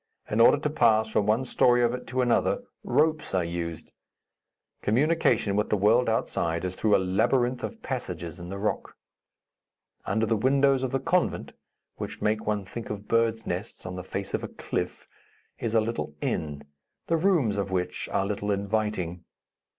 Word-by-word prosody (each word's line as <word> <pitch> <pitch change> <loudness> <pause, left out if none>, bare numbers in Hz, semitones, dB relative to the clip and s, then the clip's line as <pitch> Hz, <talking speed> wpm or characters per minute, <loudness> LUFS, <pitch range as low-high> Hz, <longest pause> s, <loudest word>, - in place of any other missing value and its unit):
In 110 +2 +3
order 120 - +7
to 150 +1 -1
pass 110 -6 +3
from 105 -1 +1
one 110 +5 +2
story 120 -1 +4
of 120 0 +2
it 125 - -6
to 125 +1 0
another, 120 - +2 0.2
ropes 155 -2 +1
are 90 - +2
used. 85 -1 -5 0.9
Communication 125 -4 +2
with 105 +1 +1
the 105 - +2
world 115 +5 +4
outside 85 -6 -1
is 90 0 -3
through 105 +1 +3
a 95 - +1
labyrinth 120 +2 +2
of 230 -1 -6
passages 90 - -4
in 85 0 -8
the 100 - -5
rock. 105 +2 -2 1.1
Under 110 +3 +1
the 115 +1 +1
windows 135 +3 +3
of 130 - -1
the 135 - 0
convent 180 +5 0 0.4
which - - -6
make 110 +1 0
one 105 -2 0
think 115 +4 -7
of 105 -1 -6
birds' 115 -1 +1
nests 90 +5 -5
on 90 - -5
the 90 - -5
face 95 +1 -5
of - - -1
a - - -3
cliff - - -4 0.5
is 115 0 -2
a 110 - +5
little 110 -9 -3
inn, 75 -2 -3 0.4
the 165 - +1
rooms 165 - +2
of 100 -1 -2
which 90 -1 -2
are 95 - +1
little 105 0 -3
inviting. 100 -4 -1
110 Hz, 175 wpm, -27 LUFS, 95-125 Hz, 1.1 s, order